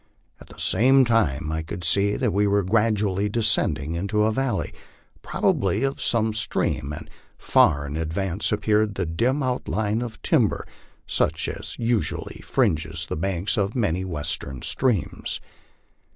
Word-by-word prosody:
At - - -14
the - - -15
same 130 +6 +4
time 80 - +1
I 80 0 -1
could 85 +2 -7
see 100 +4 +2
that 125 -6 0
we 105 +1 +2
were 100 0 +2
gradually 105 -1 +1
descending 85 -9 +1
into 100 +5 0
a 110 - +3
valley, 125 -3 -1 0.5
probably 105 +6 0
of 135 0 -1
some 110 -2 +1
stream, 75 -8 -1
and 75 - -7 0.3
far 70 -1 +3
in 70 +1 -5
advance 85 +4 -1
appeared 105 -1 +1
the 95 - -1
dim 120 - 0
outline 110 -3 -1
of 115 -3 -6
tim - - +4
ber, - - -5 0.4
such - - 0
as - - -6
usually 115 -2 -1
fringes 80 +1 0
the - - -4
banks 95 +3 -1
of 100 0 0
many 95 -7 0
of 95 - -4
the 90 - -5
Western 75 -4 -2
streams. 120 - 0
100 Hz, 155 wpm, -24 LUFS, 85-110 Hz, 0.5 s, same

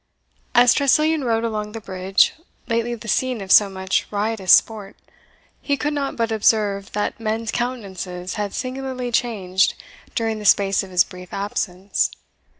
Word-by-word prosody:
As 245 0 +7
Tressilian 305 +2 +2
rode 230 -2 0
along 210 -2 -3
the 225 - -5
bridge, 190 -1 +1 0.3
lately 230 0 -1
the 230 0 -11
scene 255 +1 0
of 195 -1 -5
so 205 -2 +7
much 190 0 -1
riotous 205 -2 -1
sport, 210 -3 +3 0.7
he 285 -1 0
could 295 +2 -1
not 280 -2 -2
but 230 -1 -1
observe 205 -2 +1
that 210 +2 -2
men's 225 0 -2
countenances 190 -7 -4
had 205 -2 -4
singularly 255 -1 -4
changed 195 -6 +1 0.4
during 225 -2 -1
the 210 - -8
space 195 -1 +4
of 195 - -9
his 180 -1 +4
brief 180 0 -12
absence. 195 -1 -2
215 Hz, 155 wpm, -21 LUFS, 195-240 Hz, 0.7 s, As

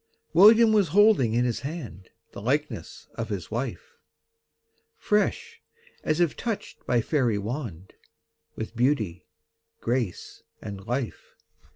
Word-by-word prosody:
William 220 +5 +7
was 205 -4 +4
holding 190 - +4
in 120 +1 +2
his 120 -2 -1
hand 130 - -7 0.2
The - - -9
likeness 125 - -2
of 115 0 -5
his 100 -3 -5
wife! 120 +4 -5 1.0
Fresh, 445 - -1 0.4
as 155 +2 0
if 170 -4 +2
touched 230 -4 -5
by 120 - +3
fairy 120 -5 +1
wand, 100 - -5 0.6
With 110 +1 -6
beauty, 115 - 0 0.5
grace, 120 -6 -3 0.2
and 100 -1 -8
life. 120 -6 -4
125 Hz, 115 wpm, -26 LUFS, 110-165 Hz, 1.0 s, William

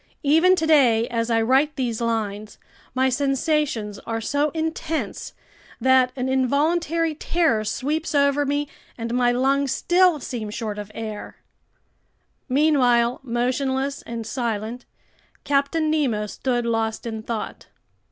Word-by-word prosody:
Even 325 +6 +5
today 275 -9 +4
as 230 -1 -1
I 225 -1 +2
write 270 +6 +2
these 240 -3 -2
lines, 215 -2 -2 0.4
my 260 +1 +3
sensations 270 -5 0
are 225 0 -4
so 285 +6 0
intense 320 0 -3 0.5
that 260 -1 +4
an 255 -1 -2
involuntary 310 +5 +1
terror 310 -7 +1
sweeps 295 +9 -2
over 280 0 +3
me, 290 +1 -1 0.3
and 230 0 -4
my 245 0 +3
lungs 270 +2 +1
still 355 -3 +3
seem 235 -4 -5
short 210 -1 -4
of 205 0 -7
air! 215 -2 -6 1.1
Meanwhile, 250 -4 +3
motionless 265 +2 -1
and 230 -1 -6
silent, 230 0 -3 0.6
Captain 290 +3 +1
Nemo 255 -9 0
stood 240 +3 -2
lost 225 -1 -1
in 220 -2 -4
thought. 225 0 -5
260 Hz, 125 wpm, -23 LUFS, 230-290 Hz, 1.1 s, Even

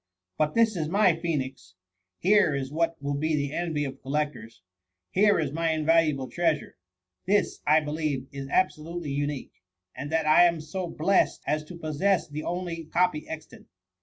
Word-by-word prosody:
* 90 0 -57
But 155 -1 +1
this 225 -2 +4
is 155 -3 -2
my 190 -2 +4
Phoenix 135 - -4 0.2
— 90 0 -55
here 195 -5 +4
is 135 -1 -3
what 165 +1 0
will 140 0 -1
be 155 +2 0
the 145 -1 -2
envy 160 -4 -1
of 135 0 -7
collectors! 135 -9 -3 0.5
here 205 +1 +4
is 150 -4 -1
my 165 +1 0
invaluable 155 -3 +2
treasure! 165 -2 -1 0.5
This, 205 +2 +1
I 155 +2 +5
believe, 150 -3 -2
is 140 -1 -6
abso 185 +3 +1
lutely 165 -1 -5
unique, 145 0 -4 0.3
and 145 +2 -6
that 160 -1 +1
I 155 +3 +7
am 170 -2 +2
so 175 +4 -4
blest 175 +4 +1
as 150 0 0
to 175 - -10
pos» 155 -3 -5
sess 195 -2 +2
the 150 0 -5
only 170 -1 -4
copy 160 -1 0
extant. 160 -1 -9
155 Hz, 180 wpm, -27 LUFS, 145-170 Hz, 0.5 s, I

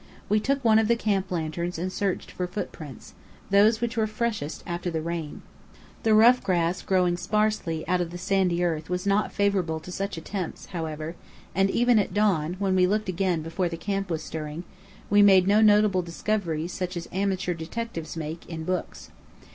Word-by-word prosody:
We 210 - +4
took 275 +3 -1
one 220 -1 +6
of 220 - +2
the 235 - +4
camp 205 -4 0
lanterns 170 +1 -3
and 185 +3 -3
searched 195 -3 -2
for 180 - -3
footprints 160 - -7 0.4
those 215 +3 +5
which 235 +1 -1
were 220 -1 +1
freshest 215 -9 -3
after 175 0 -3
the 165 -2 -2
rain. 165 -2 -5 0.6
The 220 -1 +4
rough 240 +3 +6
grass 175 -1 +1
growing 180 -2 +2
sparsely 210 -6 -1
out 180 +1 +2
of 175 - -2
the 175 - -7
sandy 180 -1 +1
earth 160 -2 -1
was 180 +1 -2
not 200 +1 +2
favourable 190 -6 0
to 180 - -9
such 195 0 -3
attempts, 180 +2 -5
however; 160 -1 -4 0.4
and 195 0 +2
even 240 +1 +4
at 195 -2 -2
dawn, 180 -6 +2
when 190 -1 0
we 180 -1 +4
looked 210 +1 0
again 180 -3 0
before 170 +2 -1
the 165 - -5
camp 195 +1 -2
was 160 -2 -2
stirring, 155 +1 -5 0.5
we 205 0 +6
made 190 -3 +7
no 210 +2 +5
notable 210 -3 +5
discoveries 170 -2 -2
such 180 -1 -3
as 170 - -5
amateur 190 -1 -1
detectives 170 0 -5
make, 160 +1 -5
in 160 -1 -5
books. 180 +1 -4
185 Hz, 185 wpm, -26 LUFS, 165-205 Hz, 0.6 s, made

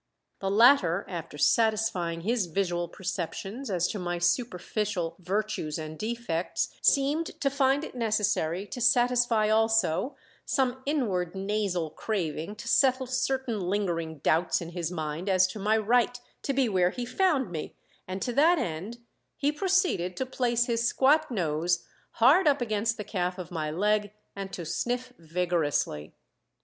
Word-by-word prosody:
The 195 - -2
latter, 205 -4 +5
after 165 -5 -6
satisfying 185 -1 +1
his 220 0 0
visual 175 -1 -1
perceptions 195 +8 -5
as 180 -2 +1
to 210 - -4
my 175 -1 -2
superficial 180 -1 -1
virtues 190 -4 -2
and 155 -1 -6
defects, 215 -4 -2
seemed 290 +4 +1
to 275 - +1
find 275 +1 +2
it - - -7
necessary 210 -6 0
to 245 - -7
satisfy 240 -2 +3
also 225 - +2 0.3
some 260 -1 0
inward 200 - -1
nasal 190 -4 -1
craving 170 -2 -3
to - - -9
settle 260 -1 +3
certain 255 -2 -1
lingering 175 -4 -2
doubts 165 +3 +2
in 170 - -6
his 170 -1 -4
mind 160 +2 -4
as 185 -1 +5
to 185 +3 -5
my 215 +2 +2
right 245 +3 +2 0.2
to - - -1
be 270 -2 +2
where 185 -4 +2
he 245 +5 -5
found 275 - +1
me, 155 -3 -5 0.3
and 185 +1 -4
to 245 - -2
that 325 +7 +5
end 210 - -4 0.3
he 290 0 +1
proceeded 360 - +1
to 260 - -1
place 245 -2 +1
his 235 -1 0
squat 280 +6 +3
nose 170 - 0 0.3
hard 295 +10 +5
up 285 -1 +4
against 225 -1 -1
the 210 - -4
calf 180 -2 -2
of 180 -1 -7
my 155 -3 -2
leg, 205 +5 +1 0.2
and 195 -1 -6
to 175 -3 -6
sniff 245 +9 -2
vigorously. 165 - -1
205 Hz, 150 wpm, -28 LUFS, 175-245 Hz, 0.3 s, latter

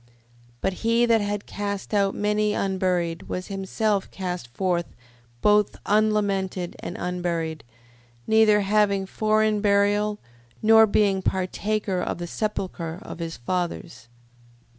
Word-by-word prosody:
But 190 - 0
he 230 +1 +3
that 230 -2 +3
had 205 0 -3
cast 200 0 -4
out 200 -1 +2
many 210 0 +1
unburied, 180 -3 -1
was 185 +2 -4
himself 195 +1 -1
cast 180 -8 -5
forth 175 +7 -1 0.6
both 210 -1 +4
unlamented 200 -4 +1
and 175 - -6
unburied, 170 -3 -2 0.6
neither 220 -1 +5
having 200 -1 +2
foreign 215 +1 +1
burial, 205 +1 +2 0.4
nor 220 0 +6
being 200 -2 +2
partaker 190 +1 -1
of - - -2
the 175 - -5
sepulchre 180 -4 -3
of - - -9
his 165 -1 -5
fathers. 170 -1 -4
200 Hz, 120 wpm, -24 LUFS, 180-210 Hz, 0.6 s, nor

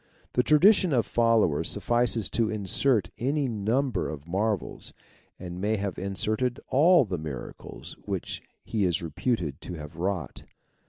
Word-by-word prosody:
The 125 - +4
tradition 175 - +5
of 120 -3 +2
followers 115 -10 +2
suffices 120 -2 +1
to 115 -2 +1
insert 110 +3 +1
any 140 +3 0
num 120 +5 0
ber 100 - -2
of 75 0 -8
marvels, 100 +2 -2 0.4
and 90 0 -7
may 105 +2 +1
have 100 -2 -3
inserted 110 +6 -1
all 160 +2 +5
the 90 -5 -3
miracles 65 -4 -8
which - - -4 0.2
he 110 -3 -1
is 90 -2 +1
reputed 85 - -2
to 90 - -6
have 75 0 -9
wrought. 90 -4 -3
105 Hz, 145 wpm, -27 LUFS, 90-125 Hz, 0.4 s, tradition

